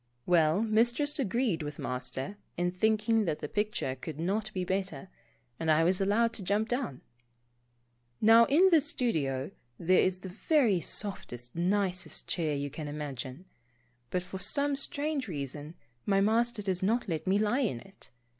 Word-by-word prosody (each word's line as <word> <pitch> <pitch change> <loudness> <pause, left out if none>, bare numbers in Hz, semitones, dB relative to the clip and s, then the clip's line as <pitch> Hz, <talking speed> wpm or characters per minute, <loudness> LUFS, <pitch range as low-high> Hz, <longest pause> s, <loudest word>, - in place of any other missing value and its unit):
Well, 170 +3 +3
Mistress 235 +7 +2
agreed 235 -6 0
with 150 -1 -5
Master 130 +9 -4 0.2
in 175 0 0
thinking 220 +3 +2
that 155 -4 -1
the - - -5
picture 210 -8 -1
could 145 +3 -8
not 200 +5 -1
be 185 -3 -3
better, 185 -3 -3 0.5
and 160 - -1
I 155 +1 +5
was 185 +3 +2
allowed 225 +4 +2
to 220 - -3
jump 205 +4 0
down. 245 - -2 1.2
Now 225 +2 +7
in 345 +10 +5
the 325 -3 +6
studio, 155 - -1 0.3
there 180 +2 +3
is 185 0 0
the 190 - -7 0.2
very 240 - +4
softest, 125 - -4
nicest 185 +1 0
chair 155 -4 -1
you 140 0 -3
can 155 +1 -6
imagine, 145 0 -6 0.6
but 180 -1 -1
for 185 +1 -7
some 280 +9 +2
strange 285 0 -2
reason 145 -1 -6 0.3
my 195 -1 +3
Master 225 +2 +2
does 190 -2 -1
not 225 +5 +1
let 160 -2 -3
me 190 +2 +3
lie 215 +5 +1
in 210 - 0
it. 195 +10 -16
190 Hz, 160 wpm, -30 LUFS, 160-225 Hz, 1.2 s, Now